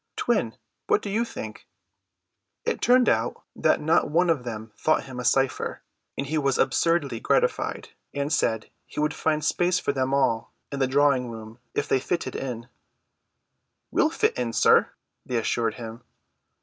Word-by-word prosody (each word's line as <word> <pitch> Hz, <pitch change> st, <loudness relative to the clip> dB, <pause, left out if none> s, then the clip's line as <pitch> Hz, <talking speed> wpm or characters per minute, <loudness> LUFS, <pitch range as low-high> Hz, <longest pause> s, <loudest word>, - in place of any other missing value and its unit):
Twin, -, -, 0 dB, 0.3 s
what 420 Hz, -, +2 dB
do 200 Hz, -, -4 dB
you 225 Hz, +3 st, +1 dB
think?" 235 Hz, -, -8 dB, 1.0 s
It -, -, -1 dB
turned 250 Hz, 0 st, +5 dB
out -, -, +1 dB
that -, -, +2 dB
not 160 Hz, +3 st, +2 dB
one 170 Hz, +3 st, +3 dB
of 145 Hz, -6 st, -1 dB
them 110 Hz, -2 st, -6 dB
thought 155 Hz, -, +1 dB
him 130 Hz, -2 st, -8 dB
a -, -, -3 dB
cypher; 135 Hz, +1 st, +1 dB, 0.3 s
and 140 Hz, -, -2 dB
he 155 Hz, +3 st, 0 dB
was 140 Hz, -2 st, +1 dB
absurdly 160 Hz, -8 st, +1 dB
gratified, -, -, 0 dB, 0.2 s
and 140 Hz, +2 st, -2 dB
said 110 Hz, -6 st, 0 dB, 0.2 s
he -, -, -7 dB
would 150 Hz, +1 st, +1 dB
find 155 Hz, -1 st, 0 dB
space 180 Hz, +3 st, +2 dB
for 140 Hz, -, -1 dB
them 130 Hz, -1 st, 0 dB
all 130 Hz, -5 st, +1 dB, 0.2 s
in 140 Hz, -, -4 dB
the 135 Hz, -, +2 dB
drawing 135 Hz, -2 st, +3 dB
room 110 Hz, 0 st, -9 dB, 0.2 s
if -, -, 0 dB
they 135 Hz, -, +2 dB
fitted 170 Hz, +6 st, -2 dB
in. 120 Hz, -3 st, -5 dB, 1.2 s
"We'll -, -, +3 dB
fit -, -, +1 dB
in, 120 Hz, -2 st, -1 dB
sir," -, -, +5 dB, 0.3 s
they 125 Hz, -, -2 dB
assured 115 Hz, 0 st, 0 dB
him. 115 Hz, 0 st, -8 dB
135 Hz, 165 wpm, -25 LUFS, 120-155 Hz, 1.2 s, turned